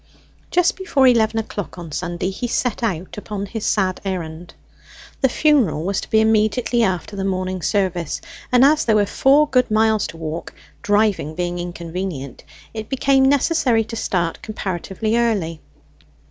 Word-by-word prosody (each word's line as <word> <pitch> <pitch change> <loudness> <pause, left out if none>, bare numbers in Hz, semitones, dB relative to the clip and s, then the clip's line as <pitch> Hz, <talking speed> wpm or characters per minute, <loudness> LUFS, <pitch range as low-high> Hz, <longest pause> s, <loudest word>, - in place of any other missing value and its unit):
Just 355 -1 +2
before 295 -8 +2
eleven 225 -3 +4
o'clock 205 -4 -5
on 170 -3 -8
Sunday 175 +3 -3
he 245 +6 -4
set 245 0 -1
out 190 -3 -3
upon 205 -1 -5
his 210 +2 -4
sad 185 -3 0
errand. 175 -3 -5 0.7
The 265 - +4
funeral 250 - +2
was 195 +2 -1
to - - -9
be 220 - +4
immediately 220 +2 +2
after 190 -1 -1
the 195 - -3
morning 185 -1 -2
service, 180 -4 -1 0.3
and 250 +1 +6
as 305 +2 +4
there 220 - +2
were 205 -1 +4
four 280 +8 +4
good 255 -4 +2
miles 220 -1 +2
to 165 - -10
walk, 160 +1 -6 0.3
driving 205 -8 +1
being 175 0 -2
inconvenient, 175 -5 -5 0.3
it 220 -1 -6
became 270 0 +3
necessary 275 -5 +2
to 225 - -8
start 175 -6 -1
comparatively 210 +1 -3
early. 195 -10 0
205 Hz, 155 wpm, -20 LUFS, 175-235 Hz, 0.7 s, and